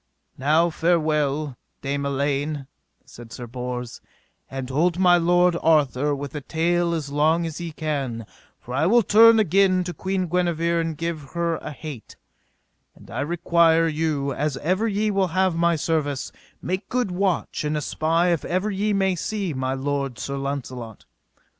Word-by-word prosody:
Now 155 +5 +3
farewell, 155 -5 0 0.2
Dame 140 0 -2
Elaine, 140 +1 -1 0.4
said 115 -1 -13
Sir 120 +1 -7
Bors, 125 0 -6 0.5
and 135 -1 -5
hold 165 +6 +1
my 180 -1 +5
lord 175 +1 +3
Arthur 145 -2 +2
with 140 -1 -6
a 150 - -4
tale 170 +3 0
as 145 -4 -4
long 160 +4 +2
as 165 +1 -5
ye 170 -1 -5
can, 140 -7 -3 0.3
for 125 - -9
I 150 +5 +2
will 235 +4 +5
turn 225 +3 +7
again 190 -2 +3
to 175 0 -5
Queen 190 +3 -2
Guenever 170 -1 0
and 165 -2 -3
give 160 -4 -5
her 170 -1 0
a - - -7
hete; 145 -6 -9 0.8
and - - -16
I - - -4
require 165 +1 +3
you, 150 -3 -1
as 145 -1 -2
ever 185 +10 0
ye 210 0 0
will 195 -2 +1
have 190 -2 +3
my 170 0 +2
service, 150 -3 -1 0.3
make 185 +3 -3
good 245 -6 0
watch 185 -3 -1
and 150 0 -1
espy 165 +4 +1
if 165 - -2
ever 185 +4 -1
ye 205 +2 0
may 195 -1 +2
see 195 0 -3
my 130 0 -2
lord 135 -2 -2
Sir 140 - -4
Launcelot. 130 -5 -5
160 Hz, 160 wpm, -23 LUFS, 140-175 Hz, 0.8 s, turn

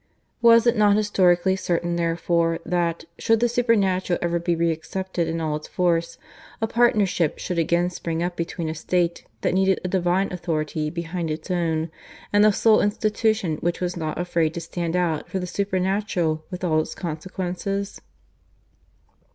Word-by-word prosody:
Was 230 0 +6
it 235 0 +4
not 210 -2 +4
historically 190 -3 +3
certain 175 -2 -1
therefore 170 0 +1
that, 170 -1 -1
should 225 -1 +3
the 240 - +3
Supernatural 200 -7 +1
ever 170 0 0
be 170 0 0
reaccepted 170 +2 -2
in 165 0 -2
all 155 -2 -1
its 150 - -11
force, 170 -2 0 0.4
a 225 - +1
partnership 210 -8 +2
should 180 -2 -3
again 170 +2 +1
spring 165 -1 -3
up 175 0 -2
between 170 0 -3
a 155 - -2
State 170 +2 -1 0.2
that - - +1
needed 190 0 +2
a - - -1
Divine 185 +1 +1
authority 155 -3 -2
behind 170 0 -4
its 155 +3 -4
own, 165 -2 0 0.4
and 205 0 +5
the 215 - +6
sole 215 +2 +4
Institution 210 -4 0
which 175 +2 -2
was 180 0 -2
not 155 -3 -3
afraid 170 -2 0
to - - -2
stand 170 0 -3
out 170 -4 0
for - - -2
the 180 - -2
Supernatural 185 -4 -1
with 180 -1 -7
all 160 -3 +2
its - - -7
consequences? 185 +4 -4
175 Hz, 160 wpm, -23 LUFS, 165-195 Hz, 0.4 s, Was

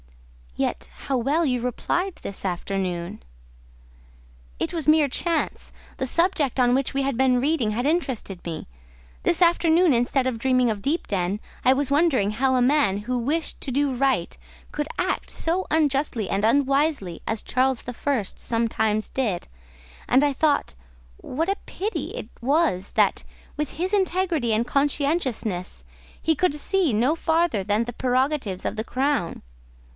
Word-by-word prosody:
"Yet - - -2 0.2
how 275 - 0
well 290 +8 +1
you 250 -4 0
replied 345 - -1
this 200 - -5
afternoon." 180 - -3 1.4
"It - - -2
was 320 -4 -3
mere 305 -1 +5
chance; 330 +5 -2 0.3
the 265 - -2
subject 315 -4 +1
on 245 -1 +4
which 270 +1 -1
we 275 0 0
had 275 -2 -1
been 255 -1 +3
reading 270 -5 +1
had 240 +4 -2
interested 260 - -1
me. 165 -2 -6 0.6
This 345 - +1
afternoon, 340 -1 +4
instead 250 +2 +1
of 240 -3 -2
dreaming 255 0 +2
of 210 -2 -2
Deepden, 200 - -1 0.2
I 255 - +5
was 275 0 -1
wondering 280 -9 +3
how 260 +4 +1
a 250 - +3
man 270 -7 +3
who 245 +5 -2
wished 300 +7 -2
to 270 - -3
do 280 +1 +1
right 255 -8 0 0.4
could 295 0 -3
act 365 +1 -1
so 350 +3 -1
unjustly 280 -8 +1
and 195 +1 0
unwisely 275 - +1
as 220 -1 -1
Charles 260 -1 +1
the 245 - -6
First 240 -6 -2
sometimes 220 -2 0
did; 220 -10 -2 0.6
and 265 - +5
I 290 -1 +2
thought 295 +1 +1 0.4
what 320 +6 -3
a 395 +1 0
pity 420 +4 -3
it - - -6
was 270 - +1
that, - - +3 0.3
with 300 -2 -3
his 365 +5 -2
integrity 365 - +1
and 220 +2 +2
conscientiousness, 260 - -1 0.3
he 320 - +1
could 360 -1 +1
see 350 +1 +2
no 240 +8 +2
farther 330 - +1
than 210 +4 +1
the 240 - -6
prerogatives 255 -5 0
of - - -1
the 220 - -2
crown. 260 - -1
265 Hz, 155 wpm, -24 LUFS, 225-310 Hz, 1.4 s, mere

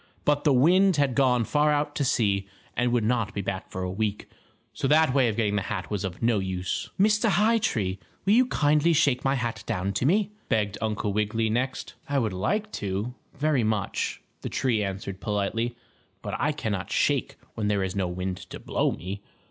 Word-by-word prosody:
But 145 0 +2
the 150 - +5
wind 180 +8 +5
had 140 -3 +2
gone 125 -3 +3
far 150 +6 +2
out 145 0 0
to 145 - +1
sea, 100 -6 +1 0.3
and 125 0 +1
would 120 -2 +2
not 115 -2 0
be 100 - -1
back 95 -1 -4
for 95 - -4
a 90 - -2
week. 105 +1 -2 0.5
So - - -1
that 155 -1 +4
way 135 -3 +4
of 110 - -2
getting 105 -3 +1
the - - +1
hat 95 0 -4
was 105 -2 -1
of 95 +2 -5
no 115 -3 +3
use. 95 -1 -3
"Mr. 210 +2 +4
High 220 +3 +3
Tree, 95 - -1 0.3
will 200 - +4
you 250 +2 +5
kindly 150 -4 +3
shake 140 -5 +2
my 135 +1 +2
hat 120 -4 -2
down 95 +2 -1
to 125 - +1
me?" 200 +4 +2 0.2
begged 105 -3 +1
Uncle 105 -2 -1
Wiggily 110 +1 0
next. 130 +3 -2 0.2
"I 145 - +1
would 110 -7 0
like 210 - -1
to, 100 +4 -2 0.2
very 145 -3 +1
much," 110 -2 -1 0.2
the - - -4
tree 115 -5 +1
answered 95 0 -5
politely, 110 +3 -1 0.5
"but - - -4
I - - +2
cannot - - -3
shake - - +1 0.2
when 105 -2 -2
there 100 -2 +1
is 95 0 -3
no 95 -2 0
wind 90 +1 -3
to - - -7
blow - - 0
me. 95 +3 -6
115 Hz, 205 wpm, -26 LUFS, 100-145 Hz, 0.5 s, the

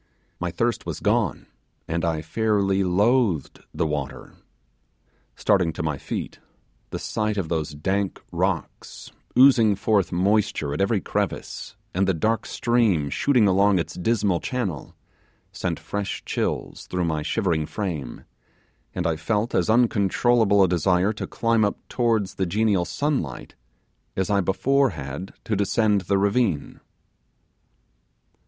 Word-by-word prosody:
My - - -2
thirst - - -1
was - - -4
gone, - - 0 0.4
and 85 +1 -2
I 80 -2 -1
fairly 100 +2 +1
loathed 100 - +1
the - - -1
water. 70 -3 -4 1.0
Starting 90 -4 +2
to 75 - -4
my 75 -3 -2
feet, - - -5 0.5
the - - -4
sight 105 -1 -2
of 90 -5 -2
those 80 -3 -2
dank 95 +6 -1
rocks, - - -3 0.3
oozing 125 -6 +6
forth 100 -4 +1
moisture 95 -5 +1
at 75 - -2
every 100 0 +1
crevice, - - -3 0.2
and 95 +2 +1
the 95 - +2
dark 110 +8 0
stream 110 - +1
shooting 125 - +3
along 100 +1 +4
its 85 - -2
dismal 100 -2 +1
channel, 100 - -4 0.6
sent - - -3
fresh 100 -1 -4
chills - - -3
through 90 -1 -1
my 80 -2 -1
shivering 80 -3 0
frame, 85 - -4 0.7
and 90 - -2
I 85 -1 +1
felt 105 +8 -1
as 90 - +1
uncontrollable 110 -1 +3
a - - +4
desire 90 +3 +2
to 105 - -5
climb 115 0 +1
up 100 - 0
towards 115 -5 +1
the 95 - -1
genial 100 -1 +1
sunlight 130 - -2 0.6
as 95 +2 0
I 100 -1 +3
before 135 +9 +2
had 70 +7 -6
to 110 - -1
descend 105 0 +2
the 100 +2 0
ravine. 100 - 0
100 Hz, 135 wpm, -24 LUFS, 85-110 Hz, 1.0 s, oozing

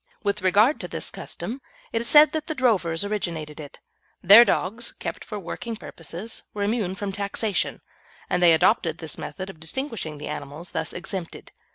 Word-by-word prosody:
With 200 0 0
regard 205 +10 +4
to - - -5
this - - -4
custom, 255 +5 -6 0.3
it 230 - +1
is 235 - -2
said 300 0 +8
that 310 -1 -3
the 315 - -3
drovers 200 - +2
originated 170 -7 -3
it. 145 -2 -10 0.4
Their 205 +6 +10
dogs, 230 +1 -1
kept - - -6
for 210 - -6
working 225 +4 -5
purposes, 175 +2 -6
were 205 - -1
immune 205 -3 0
from 200 0 -3
taxation, 200 +1 -1 0.5
and 180 - 0
they 170 -2 +7
adopted 160 0 +2
this 160 -2 -7
method 185 -1 -6
of 160 - -20
distinguishing 165 - -4
the 145 - -7
animals 150 +3 -7
thus 160 -1 -2
exempted. 180 -1 -5
195 Hz, 175 wpm, -25 LUFS, 165-225 Hz, 0.5 s, Their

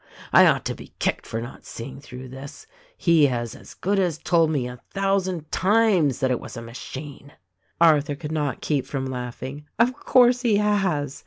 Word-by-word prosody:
I - - +8
ought - - +2
to - - -1
be - - -13
kicked - - -1
for 115 - -3
not 120 +2 -8
seeing 130 +3 -8
through 130 -1 -10
this. 135 +3 -10 0.3
He 165 -4 +4
has 120 -3 -3
as - - -13
good 200 +2 0
as 175 -5 +1
told 165 -1 +2
me, 140 -6 -1
a 125 0 -9 0.2
thou 195 0 +2
sand 180 -5 -5
times, 190 - +3
that 130 -1 +2
it 125 - 0
was - - -9
a - - -5
machine." 135 +4 -9 0.5
Arthur 150 -3 +4
could 150 +1 -7
not 145 -5 -2
keep 145 -4 -1
from 135 -2 -3
laughing. 130 +3 -6
"Of 235 +3 +3
course 250 -2 +4
he 225 -5 +3
has! 190 -10 0
150 Hz, 190 wpm, -24 LUFS, 130-190 Hz, 0.5 s, I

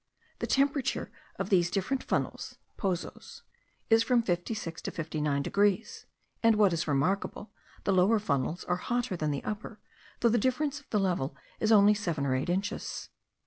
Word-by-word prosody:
The - - -2
temperature 275 -1 +1 0.3
of 195 +1 -3
these 175 -2 +4
different 215 +8 -1
funnels - - -2 0.2
(pozos) 185 -5 -4 0.5
is 225 0 +7
from 235 0 +3
56 175 -2 -3
to - - -4
59 150 -3 -1
degrees; 205 +4 0 0.3
and 230 -1 +5
what 205 -4 +4
is 165 0 -1
remarkable, 185 +9 -1 0.3
the 195 - +2
lower 190 +5 +4
funnels 155 -3 -1
are 180 - 0
hotter 240 0 -1
than 155 -3 -1
the 140 -2 -2
upper, 215 +1 -5 0.4
though 235 - +5
the 235 +1 +3
difference 280 +5 0
of 285 - -24
the 210 - +1
level 170 -8 -1 0.2
is 220 - +2
only 210 -1 +7
seven 170 -9 -2
or 130 - +1
eight 130 +5 -1
inches. 195 +4 -3
200 Hz, 165 wpm, -30 LUFS, 170-225 Hz, 0.5 s, is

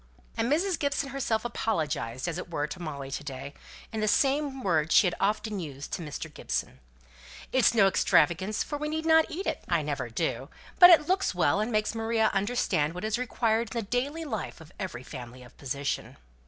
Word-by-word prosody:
And 230 +2 0
Mrs. 355 +4 +1
Gibson 280 -2 -1
herself 240 -5 -1
apologized, 155 - -2
as 175 0 -2
it 180 - -7
were, 145 -3 -1
to 175 +4 -7
Molly 140 -4 -6
to 140 - -4
day, 140 0 -7 0.4
in 220 - -2
the 215 - 0
same 270 +3 +1
words 160 -4 +2
she - - +7
had 175 - +1
often 210 +1 0
used 140 -5 -7
to - - -2
Mr. 155 0 -6
Gibson, 65 - -3 0.7
"It's 255 -2 +4
no 205 -3 +6
extravagance, 185 +1 +2
for 295 - -5
we 300 0 -2
need 315 +1 -3
not 320 -1 +5
eat 365 +5 -5
it - - -2
I - - +2
never - - -3
do. - - -2 0.3
But 355 - +11
it 320 -4 +7
looks 375 - +1
well, 175 +1 +2
and 215 +3 -1
makes 215 -1 +1
Maria 225 -1 +1
understand 195 -7 0
what 180 - -6
is 220 +2 0
required 230 -2 0
in - - +1
the 210 - -5
daily 285 +7 -1
life 220 -10 -4
of 160 +1 -14
every 180 -11 -5
family 125 -2 -9
of 125 - -16
position." 140 +1 -3
215 Hz, 200 wpm, -28 LUFS, 155-260 Hz, 0.7 s, But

